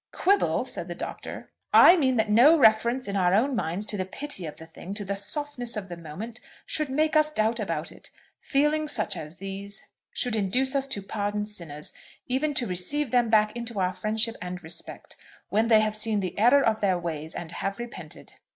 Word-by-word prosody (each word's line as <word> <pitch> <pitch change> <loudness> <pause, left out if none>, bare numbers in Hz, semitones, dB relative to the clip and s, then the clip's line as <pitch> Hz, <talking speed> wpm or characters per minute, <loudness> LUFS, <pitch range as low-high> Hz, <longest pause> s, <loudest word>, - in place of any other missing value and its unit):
"Quibble!" 400 +2 +2
said - - -3
the - - -6
Doctor. - - -7 0.2
"I 350 - +9
mean 260 -7 +2
that 220 - +2
no 245 +10 +6
reference 235 0 +4
in 200 - -3
our 185 -1 +3
own 260 +6 +2
minds 185 0 -2
to 210 0 -3
the 185 - -1
pity 195 - -5
of 150 - -9
the 160 - -11
thing, 175 +4 -9
to 205 -1 -5
the 200 +1 -2
softness 245 +3 -1
of 195 -3 -5
the 175 - -5
moment, 185 +9 -8 0.3
should 305 -3 -3
make 305 +4 +1
us 305 0 +5
doubt 225 -4 0
about - - -3
it. - - -13 0.3
Feelings 300 +2 +1
such 220 -7 -1
as 155 +2 -7
these 195 +2 -6 0.2
should 245 -3 -1
induce 245 +7 +1
us 275 -1 0
to 240 -8 -3
pardon 205 +1 -2
sinners, 165 -8 -9 0.3
even 280 +4 -1
to 250 - 0
receive 225 +9 -1
them 245 -2 +3
back 215 0 +3
into 235 -3 -4
our 185 0 +1
friendship 220 +4 -1
and 180 0 -6
respect, 160 +2 -7 0.3
when 220 +2 +2
they 220 -2 +6
have 215 0 0
seen 215 0 +2
the 185 -2 -4
error 250 +6 +5
of 220 -1 +1
their 190 -3 +2
ways 160 -2 -5
and 165 -1 -6
have 195 +3 -3
repented." 240 0 -9
215 Hz, 205 wpm, -26 LUFS, 190-255 Hz, 0.3 s, I